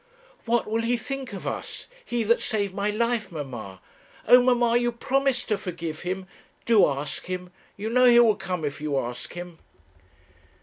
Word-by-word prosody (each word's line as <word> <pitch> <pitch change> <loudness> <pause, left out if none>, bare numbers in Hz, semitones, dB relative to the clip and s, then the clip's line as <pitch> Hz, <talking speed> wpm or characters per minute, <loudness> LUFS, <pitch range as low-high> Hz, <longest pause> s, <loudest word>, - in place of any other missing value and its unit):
'What 235 0 +2
will 225 +1 -1
he 240 +1 +1
think 265 +3 -5
of 195 - -7
us? - - -4 0.2
he 240 - -1
that 230 +2 +3
saved 200 -4 -1
my 200 +1 -1
life, 230 -1 0
mamma! 120 - -7 0.5
Oh, 250 0 +8
mamma! 240 -2 +3
you 240 0 +2
promised 265 +1 0
to 210 -2 +1
forgive 170 -5 -5
him. 185 +2 -3 0.4
Do 225 -3 +6
ask 140 +3 -4
him. 180 -1 -5 0.3
You 205 +2 -4
know 250 +1 +5
he 240 -1 +7
will 225 -3 +5
come 185 -5 -3
if 145 +1 -4
you 150 -2 -1
ask 125 -1 -4
him.' 175 -1 -8
210 Hz, 175 wpm, -25 LUFS, 175-240 Hz, 0.5 s, Oh